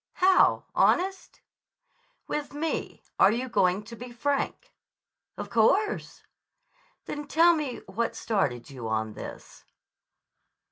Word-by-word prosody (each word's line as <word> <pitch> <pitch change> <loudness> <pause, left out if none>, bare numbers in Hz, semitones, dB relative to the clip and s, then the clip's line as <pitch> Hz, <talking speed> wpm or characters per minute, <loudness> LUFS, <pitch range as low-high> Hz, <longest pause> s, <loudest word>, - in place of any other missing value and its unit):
"How, 370 0 +4
honest?" 380 +2 +1 0.8
"With 290 -1 -4
me. 320 +2 -3 0.2
Are 195 - +7
you 245 +3 -2
going 185 -4 +2
to 230 +2 -10
be 245 +2 -9
frank?" 280 - -2 0.6
"Of - - -6
course." 385 - +1 0.8
"Then 295 -1 -6
tell 335 +3 +5
me 295 -6 -3
what 225 +5 -2
started 140 - -1
you 125 -4 -6
on 110 0 -1
this." - - -10
245 Hz, 110 wpm, -27 LUFS, 195-320 Hz, 0.8 s, Are